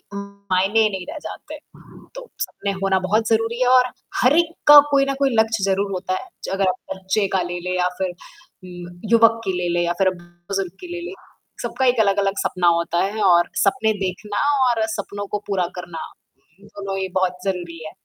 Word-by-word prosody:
मायने 200 +1 0
ही 215 - +4
नहीं 190 -2 -5
रह 315 - -6
जाते। - - -8 0.6
तो - - -9
सपने 200 - -3
होना 190 -1 +2
बहुत 210 +4 0
ज़रूरी 225 +1 +1
है 250 - +3
और 255 -1 +6 0.4
हर 255 +5 +5
एक 335 -1 +2
का 295 0 +11
कोई 275 -1 +4
न - - +1
कोई 275 - +3
लक्ष्य 220 -2 +1
ज़रूर 195 +1 0
होता 185 0 -3
है। - - -14 0.3
अगर 195 -1 +1
आप 185 - -1 0.2
बच्चे 190 +2 0
का 190 - +2
ले 175 - -3
ले 185 - -1
या 180 0 +2
फिर 185 -1 -1 0.5
ल 175 -1 -10
युवक 230 0 +5
की 190 - 0
ले 180 -1 -1
ले 175 - +1
या 175 - 0
फिर 195 - +3
अब 185 -1 0
बुजुर्ग 175 +2 -5
की 360 - -8
ले 350 - -5
ले। 390 - -7 0.5
सबका 265 - -1
एक 245 -1 +3
अलग 200 -1 +2
अलग 195 0 0
सपना 180 -1 0
होता 170 0 -1
है 210 +3 -2
और 175 -2 +4 0.2
सपने 220 +2 +2
देखना 205 +3 -3 0.3
और 225 -2 +1
सपनों 205 0 -5
को 210 - -3
पूरा 190 -3 0
करना 175 -2 -7 0.7
दोनों 195 -1 -6
ही 190 - -2
बहुत 185 -1 +1
ज़रूरी 175 -3 -3
है। 155 - -7
195 Hz, 205 wpm, -21 LUFS, 180-220 Hz, 0.7 s, का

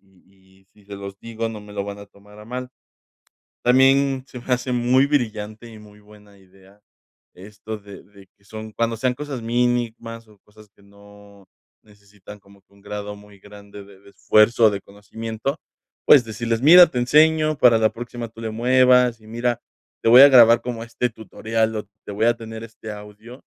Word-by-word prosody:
y 95 0 -28
y - - -38
si 105 - -24
se 100 0 -9
los 100 0 -10
digo, 115 0 -5
no 110 -2 -8
me 105 0 -14
lo 100 -1 -4
van 100 0 -8
a 100 - -12
tomar 105 +1 -20
a - - -13
mal. 125 +2 -6 1.0
También 135 +1 +3
se 125 - -10
me 125 +1 -2
hace 125 +1 -3
muy 125 +3 +2
brillante 110 -5 -3
y 110 - -13
muy 105 0 -17
buena 105 -1 -20
idea 95 +1 -23 0.6
esto 105 +3 -10
de 100 -1 -14
de 100 -1 -20
que 100 - -33
son 110 +1 -10
cuando 115 +1 -2
sean 125 +2 -1
cosas 140 -2 -7
mínimas 115 -1 -2
o 105 -1 -22
cosas 105 0 -20
que - - -26
no 100 0 -19 0.4
necesitan 105 -1 -16
como 100 0 -22
que 95 - -36
un 100 - -23
grado 105 0 -7
muy 105 -1 -18
grande 100 0 -14
de 100 -1 -18
de 100 0 -19
esfuerzo 110 +3 +3
o - - +4
de 100 -1 -5
conocimiento, 110 +6 -7 0.5
pues 140 - +7
decirles: 115 +2 -4
"Mira, 175 +4 +8
te 130 - -5
enseño 155 +4 +2
para 120 -3 +5
la 110 -1 +2
próxima 120 0 -8
tú 115 0 -15
le 110 - -4
muevas 125 +1 +3
y 110 - -19
mira, 120 +1 -2 0.4
te - - +3
voy 125 +3 +9
a 140 - +10
grabar 120 -3 +6
como 115 -2 -6
este 120 +1 -3
tutorial 110 0 -3
o 105 - -3 0.2
te 100 - -7
voy 110 +3 0
a 120 0 +2
tener 115 -1 -9
este 110 -1 -10
audio 105 +5 -13
110 Hz, 195 wpm, -21 LUFS, 100-120 Hz, 1.0 s, a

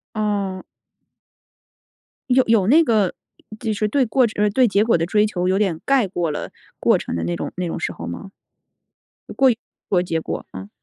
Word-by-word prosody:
哦。 200 -3 -2 1.7
有 255 +1 +5
有 215 -4 +3
那 320 +7 +6
个， 215 - +2 0.5
就 220 -2 -2
是 210 +1 0
对 260 +4 +2
过 250 +3 +3
程 215 - -8
就 210 - +1
是 210 - +3
对 250 +4 +3
结 200 +1 +2
果 225 - +3
的 165 - 0
追 210 +3 +2
求 180 -3 -2
有 190 +1 +2
点 185 -6 0
盖 265 -7 +3
过 175 -4 -2
了 - - -5 0.3
过 - - +3
程 - - -5
的 85 - -2
那 85 +1 -2
种 - - -5
那 180 -1 -2
种 - - -4
时 - - -2
候 85 - -8
吗？ 85 - -7 1.1
过 265 -1 +5
于 230 - -1 0.3
的 180 -2 +3
结 165 -2 -2
果， - - -5
啊。 95 +2 -9
205 Hz, 215 characters per minute, -21 LUFS, 175-225 Hz, 1.7 s, 那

